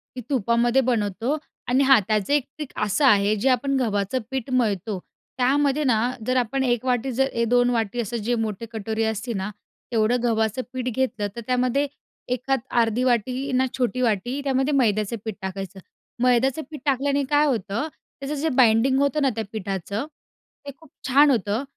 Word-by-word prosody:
ती 250 - -5
तुपामध्ये 240 0 +2
बनवतो 235 +2 0 0.3
आणि 260 +3 +3
हा 270 -2 +6
त्याचं 215 +4 +1
एक 290 -2 +3
ट्रिक 300 - -5 0.2
असं 210 +8 +1
आहे, 205 -4 +4
जे 225 +6 +1
आपण 275 +2 +1
गव्हाचं 205 0 0
पीठ 265 -1 -3
मळतो, 210 -5 0 0.4
त्यामध्ये 280 +3 +2
ना 250 -5 +3 0.3
जर 255 - +1
आपण 250 +2 0
एक 245 -1 0
वाटी 250 +1 0
जर 265 +2 +1
ए 235 - 0
2 245 +1 +3
वाटी 230 -1 -1
असं 235 +2 -4
जे 245 - +2
मोठे 215 +1 -5
कटोरी 220 0 -2
असते 220 +2 -2
ना, 190 +1 -3 0.4
तेवढं 230 +1 +2
गव्हाचं 220 0 +1
पीठ 255 -1 -3
घेतलं 250 -5 -1
तर 235 - -5
त्यामध्ये 255 +3 +1 0.5
एखाद 265 +2 -1 0.2
अर्धी 230 +2 0
वाटी 255 +3 0
ना 260 - +3
छोटी 255 0 0
वाटी 240 +4 0
त्यामध्ये 270 +1 +1
मैद्याचं 215 -4 +1
पीठ 220 -3 -3
टाकायचं, 190 0 -6 0.4
मैद्याचं 255 +4 +3
पीठ 300 -4 -8
टाकल्याने 280 +1 +1
काय 295 0 +4
होतं, 230 - -1 0.3
त्याचं 280 +2 -4
जे 305 +3 -1
बाइंडिंग 250 +1 +4
होतं 285 +2 +1
ना, 275 - +3
त्या 225 - -2
पिठाचं, 200 +2 -4 0.6
ते 280 - -5
खूप 320 -2 -19 0.2
छान 285 +3 +6
होतं 220 0 0
245 Hz, 175 wpm, -24 LUFS, 220-270 Hz, 0.6 s, हा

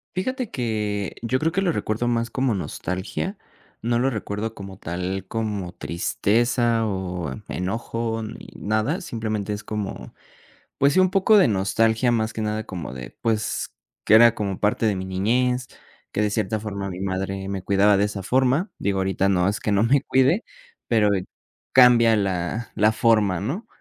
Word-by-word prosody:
Fíjate 255 +5 -2
que 105 -5 -2
yo 130 +3 0
creo 160 +1 +1
que 195 +3 0
lo 175 -4 +1
recuerdo 110 -1 -1
más 115 0 0
como 130 -2 0
nostalgia, 95 - -4 0.4
no 120 +1 +1
lo 135 +2 +2
recuerdo 110 -1 -4
como 95 -1 -9
tal, 90 +3 -4
como 105 -5 -3
tristeza 115 +7 +1
o 90 -7 -3 0.2
enojo 115 +4 -3
ni 110 +2 -8
nada, 110 - -1
simplemente 110 - -3
es 105 0 -5
como, 105 -2 -5 0.6
pues 140 +1 +3
sí, 185 - +5
un 185 0 +3
poco 195 +3 +4
de 185 - +5
nostalgia, 110 +5 +2
más 110 -1 0
que - - -7
nada 110 0 -1
como 85 -10 -7
de, 65 -1 -9
pues, 110 -2 -1 0.3
que - - +4
era 115 +1 +8
como 100 -3 -3
parte 105 +2 +1
de 105 -3 +2
mi 95 - -4
niñez, 125 +7 0 0.5
que 105 - 0
de 105 - +2
cierta 105 0 -1
forma 100 -2 -4
mi 90 0 -6
madre 95 0 -3
me 95 -2 -3
cuidaba 100 +1 +4
de 100 - +3
esa 100 -2 -5
forma. 135 - +2
Digo, 100 -1 0
ahorita 95 0 +1
no, 95 -1 +2
es 105 +4 -2
que 105 - -1
no 100 +2 +3
me 135 +4 +3
cuide, 135 - +2 0.4
pero 110 -3 +3 0.6
cambia 120 -3 +7
la 100 +3 -2
la 110 +1 +3
forma, 105 -7 +2
¿no? 145 - -4
110 Hz, 170 wpm, -23 LUFS, 95-120 Hz, 0.6 s, era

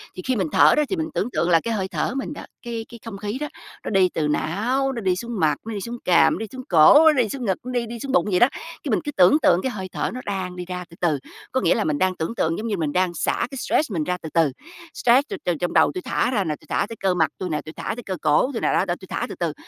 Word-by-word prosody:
thì 185 - -6
khi 255 -1 +1
mình 190 -5 0
thở 150 +2 +6
đó 300 - +4
thì 385 - 0
mình 320 -1 -3
tưởng 220 - -1
tượng 170 - 0
là 165 -1 +5
cái 230 - -1
hơi 190 -3 -1
thở - - -1
của 250 - -5
mình 275 - -4
đó, - - -9 0.2
cái 230 -2 -5
cái 235 - -11
không 210 -3 -6
khí 210 +4 -4
đó, 300 - -2 0.4
nó - - -4
đi 190 -3 +4
từ 150 -2 0
não, 235 - 0
nó 235 - -4
đi 185 -3 +1
xuống 235 +1 -5
mặt, 155 -2 +3
nó 225 - -5
đi 200 - -4
xuống 235 +3 -5
cằm, 175 -2 +5
nó - - -4
đi 225 - -3
xuống 260 -1 -8
cổ, 155 -4 +7
nó 315 - +7
đi 215 - -4
xuống 255 -1 -4
ngực, 190 -2 +1
nó 255 - -4
đi 245 -1 -1
đi 235 +1 -7
xuống 275 +3 -4
bụng 270 - +3
vậy 180 - +3
đó. 240 - +7
Cái 325 -3 -8
mình 220 - +2
cứ 295 - -3
tưởng 185 +4 +5
tượng 180 - +4
cái 260 - -1
hơi 190 -3 -6
thở - - -2
nó 255 - -5
đang 190 -3 -3
đi 180 -1 -6
ra 180 0 -5
từ 170 - -14
từ, 170 -4 +2 0.4
có 260 - 0
nghĩa - - +3
là 220 - 0
mình 150 -4 0
đang 185 +3 +1
tưởng 165 +9 -3
tượng 165 -6 0
giống 230 - -4
như 205 - -1
mình 155 -4 -1
đang 180 +2 +1
xả - - -1
cái 270 - -6
stress 295 +1 0
mình 165 -5 -1
ra 180 +3 -1
từ 160 - -6
từ. 160 -5 +3 0.4
Stress 255 +5 +3
tui 400 - -4
từ 175 - +1
trong 175 - -2
đầu - - +5
tui 365 - -4
thả 255 - 0
ra 205 -6 +1
nè, 155 -3 -2
tui - - -21
thả - - +1
tới 230 - -6
cơ 190 -1 +1
mặt 160 -4 +2
tui 185 - -4
nè, 155 - -1
tui 155 - -10
thả - - -4
tới 245 - -8
cơ 190 -3 -4
cổ 155 - +3
tui 225 - -3
nè, - - +1
đó, - - +2
đó, 175 -2 -1
tui 190 - -12
thả - - -2
từ - - -6
từ, 170 -3 -2
195 Hz, 330 wpm, -23 LUFS, 175-240 Hz, 0.4 s, cổ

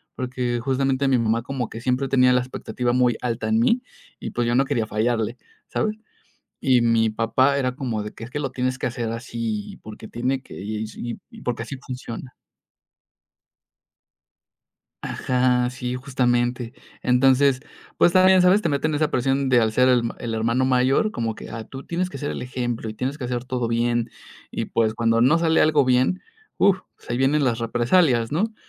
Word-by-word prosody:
porque, 125 -2 -2
justamente, 135 +1 0
mi 130 - +4
mamá 115 0 0
como 130 -3 -3
que 115 - -7
siempre 130 +2 0
tenía 125 -1 +4
la 125 - +4
expectativa 125 -1 -3
muy 125 -2 +3
alta 120 -1 -2
en 220 - +3
mí, 245 +1 +2 0.4
y - - -6
pues, 120 -1 -1
yo 120 - +1
no 135 - +4
quería 120 -6 -1
fallarle, 115 +1 -1 0.3
¿sabes? 215 0 -1 0.6
Y 130 -3 +3
mi 115 -1 +3
papá 130 +5 +2
era 130 -2 0
como 120 -6 -3
de 105 - -7
que 115 - -10
es 120 - -11
que 150 - -4
lo 135 -3 -3
tienes 130 0 -1
que - - -1
hacer 115 -1 -3
así 115 -3 -4
porque 110 +1 -10
tiene 130 +2 -1
que - - -12
y 110 +3 -6
porque 120 -1 -2
así 135 +4 -7
funciona. 125 -1 -8 2.7
Ajá. 125 -1 +1
Sí, 125 -1 -4
justamente, 125 -2 0 0.3
entonces, 130 +1 +4 0.4
pues, 175 - +5
también, 185 0 +6
sabes, 185 +4 +5
te - - +1
meten 150 +2 0
esa 150 0 +1
presión 135 +2 +1
de 125 -2 +5
al 110 -1 +1
ser 125 +3 +4
el 120 -2 +3
el 120 -2 -4
hermano 115 +3 +1
mayor 130 +10 +2
como 115 - -3
que: - - -10
"¡Ah! 115 -1 -6
tú 135 0 -9
tienes 175 +4 -2
que - - -8
ser 145 - -3
el - - -4
ejemplo, 120 -2 -3
y 110 - -6
tienes 135 +6 -3
que 130 - -5
hacer 120 0 -3
todo 125 -2 -2
bien", 120 0 0 0.4
y - - -3
pues, 110 -1 +1
cuando 115 0 +2
no 135 +8 +5
sale 165 -1 +3
algo 155 -2 +4
bien, 130 +9 +2 0.3
uf, 190 -1 +4 0.3
ahí 120 - -1
vienen 140 +3 +2
las 120 -4 +1
represalias, 120 +1 +2
¿no? 215 +9 -1
125 Hz, 185 wpm, -23 LUFS, 115-135 Hz, 2.7 s, también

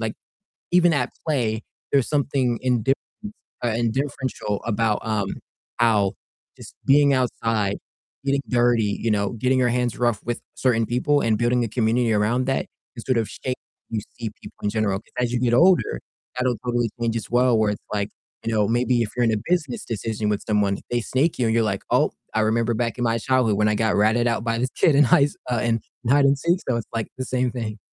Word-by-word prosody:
like, 110 -1 -2 0.6
even 175 -1 +5
at 125 -5 0 0.2
play, 115 -7 0 0.3
there's 135 -3 +3
something 135 -5 +1
indifference 125 +1 +2 0.7
uh, - - +2
and 115 0 0
differential 130 -6 -3
about, 110 -1 +1
um, 105 -3 0 0.5
how 105 -5 +3 0.4
just - - -12
being 140 0 +5
outside, 115 -5 0 0.5
getting 140 0 +1
dirty, 120 -4 +2
you 115 - +1
know, 100 -1 0
getting 130 +3 +1
your 125 - +3
hands 125 -2 0
rough 120 -4 +1
with 120 0 -3
certain 115 -3 +2
people 140 +5 +1
and 110 -2 +2
building 120 +2 +2
a - - -1
community 115 +1 +1
around 110 +5 +1
that 135 0 0 0.3
can 115 - -7
sort 130 -2 +1
of 110 -3 0
shape 130 +3 -4
how - - -12
you - - +1 0.2
see 115 -2 -3
people - - -11
in 105 - +1
general. 105 -2 0
'Cause 110 - -26
as 120 -1 0
you 125 - +1
get 120 -1 +1
older, 170 - +4 0.4
that'll 125 -2 0
totally 120 -1 0
change 115 -1 0
as 110 - -6
well, 125 -1 +3
where 110 -1 +2
it's 105 - -6
like, 100 -1 -1 0.4
you 115 - -1
know, 105 -1 +3
maybe 120 +1 +2
if 110 - -1
you're 120 - +3
in 115 - +2
a - - +1
business 155 -8 0
decision 110 -1 -2
with 105 -1 0
someone, 105 -2 +1
they 120 0 +1
snake 135 +7 0
you 120 - +2
and 110 - +1
you're 115 - +3
like, 100 -3 -2
"Oh, - - +3 0.2
I - - +1
remember 115 +2 +1
back 115 +1 -2
in 120 - -2
my 115 -1 +1
childhood 120 -3 +1
when 105 0 +3
I 105 - +2
got 110 0 +1
ratted 110 +3 +3
out 115 -1 0
by 115 0 0
this 130 +2 0
kid 155 - +4
in 145 - +7
high 135 +3 +5
s 145 - -5 0.2
uh, 120 - +1
in 115 -1 +1 0.3
hide 140 +2 +5
and 140 0 +4
seek," 170 +5 +1
so 120 - +2
it's, 115 - -5
like, 115 -1 -2
the 130 - -3
same 125 -1 0
thing. 110 -3 -5
120 Hz, 220 wpm, -23 LUFS, 110-125 Hz, 0.7 s, in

